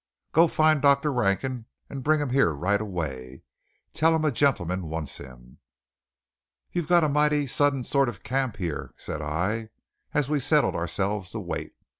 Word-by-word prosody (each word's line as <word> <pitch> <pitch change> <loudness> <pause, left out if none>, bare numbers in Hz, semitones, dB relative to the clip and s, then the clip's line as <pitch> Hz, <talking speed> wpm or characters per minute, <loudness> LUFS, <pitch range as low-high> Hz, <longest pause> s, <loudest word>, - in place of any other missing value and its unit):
"Go 165 +2 +5
find 155 -2 +3
Dr. 140 +1 +3
Rankin 120 +2 -1 0.2
and 135 - -6
bring 155 +2 +3
him 145 -2 -2
here 130 -10 +3
right 100 +8 0
away. 70 -10 -5 0.5
Tell 160 +1 +3
him 160 -1 0
a 150 - +3
gentleman 95 - 0
wants 80 -2 -4
him." 60 -2 -13 1.1
"You've 175 -3 -2
got 175 -1 +5
a - - +3
mighty 150 0 +2
sudden 140 0 +1
sort 140 0 +2
of 100 -6 -10
camp 130 -3 -1
here," 85 -6 -4
said 75 - -5
I, 95 +9 -2 0.4
as 145 -3 +1
we 150 0 +1
settled 150 +3 +3
ourselves 95 +3 -2
to - - -3
wait. - - -5
125 Hz, 165 wpm, -26 LUFS, 90-145 Hz, 1.1 s, Go